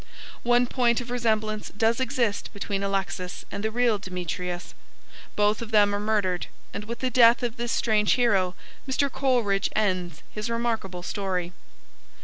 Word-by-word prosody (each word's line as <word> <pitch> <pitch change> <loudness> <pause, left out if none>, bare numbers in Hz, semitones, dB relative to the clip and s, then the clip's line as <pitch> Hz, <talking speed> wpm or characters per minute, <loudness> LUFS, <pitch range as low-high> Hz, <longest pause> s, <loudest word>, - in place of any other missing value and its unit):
One 245 +1 +4
point 240 -2 +2
of 245 0 -7
resemblance 220 -3 0
does 225 +3 +1
exist 235 -4 0
between 200 -1 -3
Alexis 195 -2 -3
and 200 - -4
the 220 - +1
real 235 -2 +2
Demetrius. 180 -1 -4 0.6
Both 210 +1 +2
of 230 - -5
them 205 -2 +4
are 205 - 0
murdered, 205 -4 0 0.3
and 210 - -5
with 235 +2 -6
the 255 -1 0
death 240 +1 +6
of 240 -1 -1
this 240 0 -2
strange 215 -2 +3
hero 195 -7 +2 0.3
Mr. 280 +1 +1
Coleridge 240 -8 +1
ends 185 -6 0
his 210 +2 -4
remarkable 225 -6 -2
story. 185 -3 -2
215 Hz, 150 wpm, -26 LUFS, 195-235 Hz, 0.6 s, death